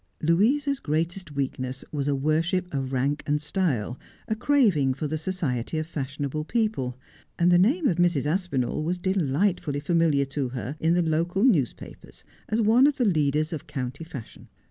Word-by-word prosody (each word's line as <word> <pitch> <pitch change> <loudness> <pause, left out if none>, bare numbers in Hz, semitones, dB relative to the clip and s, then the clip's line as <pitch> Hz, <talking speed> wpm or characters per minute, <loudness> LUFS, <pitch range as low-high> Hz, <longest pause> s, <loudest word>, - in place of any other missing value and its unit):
' - - -34
Louisa's 265 - +2
greatest 165 - -2
weakness 130 -1 -3
was 145 -2 -2
a 145 - +2
worship 165 +6 0
of 135 -2 -2
rank 135 +3 0
and 150 0 +1
style 150 - -1
— - - -30
a 220 - 0
craving 205 - +3
for 150 - -4
the 155 - -2
society 155 -6 -2
of 155 - -1
fashionable 145 -1 -4
people; 185 - -1 0.4
and 175 +1 +4
the 175 - +6
name 275 - +3
of 170 - +1
Mrs. 175 -5 +2
Aspinall 155 -4 -1
was 175 +3 -1
delightfully 175 -3 0
familiar 155 -2 +2
to 135 -1 -3
her 130 +2 -5
in 165 +2 +2
the 175 - +2
local 170 +5 0
newspapers 170 - -1 0.2
as 215 - 0
one 230 +5 +5
of 295 - +1
the 245 - +2
leaders 155 -3 +1
of 155 - -6
county 130 +3 -5
fashion. 140 -8 -10
155 Hz, 175 wpm, -26 LUFS, 140-185 Hz, 0.4 s, the